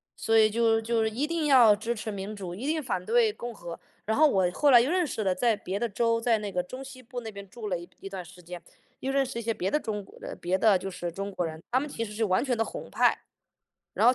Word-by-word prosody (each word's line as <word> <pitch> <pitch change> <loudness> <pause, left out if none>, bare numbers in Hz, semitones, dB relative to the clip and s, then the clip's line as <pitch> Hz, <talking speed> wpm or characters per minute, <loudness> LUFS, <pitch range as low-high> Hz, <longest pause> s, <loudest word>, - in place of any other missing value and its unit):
所 225 0 +2
以 215 -1 +6
就 225 0 +3
就 230 0 0
是 220 - +1
一 240 +7 -1
定 330 -2 -1
要 245 -7 +7
支 225 +3 -3
持 215 0 -5
民 200 +1 -5
主， 185 -4 -6
一 240 +9 -5
定 315 +1 0
反 205 -8 -2
对 225 0 +3
共 240 +2 -6
和。 170 -3 -8 0.3
然 220 - 0
后 310 +1 +7
我 190 -9 +2
后 290 +10 +2
来 245 - +9
又 260 +6 0
认 360 -1 +2
识 220 - -3
了 190 -2 +2
在 230 +3 +2
别 195 -1 -4
的 235 - -1
州， 230 +2 +1
在 230 -1 +3
那 205 -1 -5
个 180 - 0
中 255 +9 -8
西 260 -1 -11
部 245 +1 -6
那 225 -2 -7
边 200 -1 -10
住 225 +1 -7
了 180 - 0
一 180 +3 -11
段 190 -2 -6
时 180 +1 -15
间， 175 0 -8 0.4
又 265 - -1
认 275 0 +2
识 255 -2 -5
一 - - -4
些 230 0 -1
别 190 -2 -2
的 300 - +2
中 210 -6 -4
国 - - -17
的 - - -7
别 180 +2 0
的 210 -2 +5
就 195 +1 -6
是 175 -1 -4
中 195 +4 -5
国 185 - -2
人， 160 -1 -6
他 255 - +4
们 295 +2 -4
其 230 -4 -3
实 210 - -9
是 220 +2 -1
完 185 +6 +1
全 255 -3 +1
的 225 - +2
红 - - -7
派。 - - +3 0.8
然 - - +3
后， 250 - +7
220 Hz, 315 characters per minute, -28 LUFS, 195-245 Hz, 0.8 s, 来